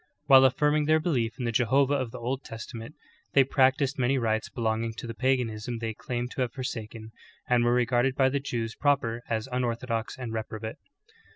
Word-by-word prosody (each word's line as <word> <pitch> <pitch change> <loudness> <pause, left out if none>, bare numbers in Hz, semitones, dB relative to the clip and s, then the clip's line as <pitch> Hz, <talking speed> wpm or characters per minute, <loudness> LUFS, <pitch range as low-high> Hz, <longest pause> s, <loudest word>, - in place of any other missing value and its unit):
While 135 -2 +8
alarming 150 +3 +1
their 155 +1 +4
belief 125 -9 -1
in 125 - -3
the 115 - 0
Jehovah 130 +4 +3
of 130 -4 -1
the - - -8
Old 130 +3 -3
Testament, 115 +3 -8 0.4
they 135 - +6
practiced 135 +1 +2
many 130 +2 +2
rites 110 -3 0
belonging 115 0 -2
to - - -7
the 115 - -5
paganism 120 -2 -1
they 115 -1 -3
claimed 120 +2 -4
to - - -3
have 125 -2 -1
forsaken, 115 -3 -6 0.4
and 125 -1 +3
were 120 - +3
regarded 125 +1 +2
by 130 -1 +4
the 140 +1 0
Jews 115 -5 -3
proper 135 -5 +1
as 110 +1 -1
unorthodox 120 -2 -2
and 125 -3 -5
reprobate. 110 0 -5
120 Hz, 185 wpm, -27 LUFS, 115-135 Hz, 0.4 s, While